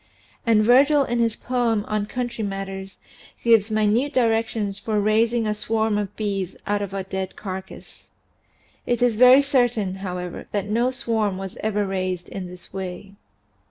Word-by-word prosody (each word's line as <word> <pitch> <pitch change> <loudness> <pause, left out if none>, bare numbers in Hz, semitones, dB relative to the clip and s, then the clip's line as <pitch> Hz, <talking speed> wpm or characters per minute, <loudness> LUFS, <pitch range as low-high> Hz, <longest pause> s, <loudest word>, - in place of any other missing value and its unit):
And 220 -2 +5
Virgil 275 +5 +5
in 240 -2 -1
his 230 -2 +1
poem 235 -4 0
on 210 -1 -1
country 240 -1 -3
matters 195 -1 -5 0.5
gives 225 -2 +4
minute 215 +6 +1
directions 225 -4 +1
for 215 -1 -1
raising 225 +3 +2
a 210 - +1
swarm 220 0 0
of 205 -2 -4
bees 195 -4 -2
out 205 0 0
of 200 -2 -4
a 195 -1 -3
dead 190 0 -5
carcass. 190 -1 -8 0.8
It 240 0 +1
is 240 -3 +3
very 255 +4 +7
certain, 245 -8 +1
however, 180 -2 -6
that 200 -2 0
no 230 +4 +1
swarm 225 -6 -1
was 190 -1 -6
ever 210 -1 0
raised 185 -2 -3
in 185 -2 -6
this 180 0 -11
way. 190 +1 -6
210 Hz, 160 wpm, -23 LUFS, 195-235 Hz, 0.8 s, very